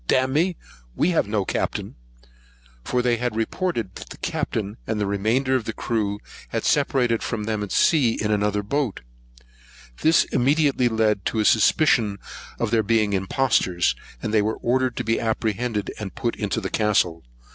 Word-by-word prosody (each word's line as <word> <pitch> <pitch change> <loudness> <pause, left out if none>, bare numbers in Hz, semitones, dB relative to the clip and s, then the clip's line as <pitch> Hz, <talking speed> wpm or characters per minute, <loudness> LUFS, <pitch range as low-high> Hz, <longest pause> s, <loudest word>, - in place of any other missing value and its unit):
dam'me, 150 +8 +2 0.4
we 175 - +2
have 165 - +1
no 105 -2 -1
Captain;" - - -2 0.9
for 125 - 0
they 120 -1 +2
had 120 -1 -2
reported, 115 - -2
that - - -10
the - - -10
Captain 105 -1 -3
and 110 -1 -1
remainder 110 +7 +1
of 125 -4 -1
the 110 - -3
crew 105 -4 -1 0.3
had - - -2
separated 125 -5 +2
from 110 -2 -3
them 110 -1 -2
at 105 - -5
sea 135 -9 +3
in 105 0 0
another 105 0 +1
boat. 135 0 -2 1.0
This 160 +1 +5
immediately 140 -1 +2
led 110 -3 +1
to 110 - -1
a 105 - +1
suspicion 110 -2 +3 0.4
of 115 -2 -1
their 115 -1 +3
being 110 -1 +1
impostors; 95 -3 +1 0.3
and 110 - -2
they 110 - +4
were 110 +2 -1
ordered 130 +1 0
to - - -1
be 115 - 0
apprehended, 110 -1 -1
and 100 -4 -6
put 120 -2 -2
into 105 +1 -2
the 95 -3 -5
castle. 105 -6 +1
110 Hz, 165 wpm, -23 LUFS, 105-125 Hz, 1.0 s, This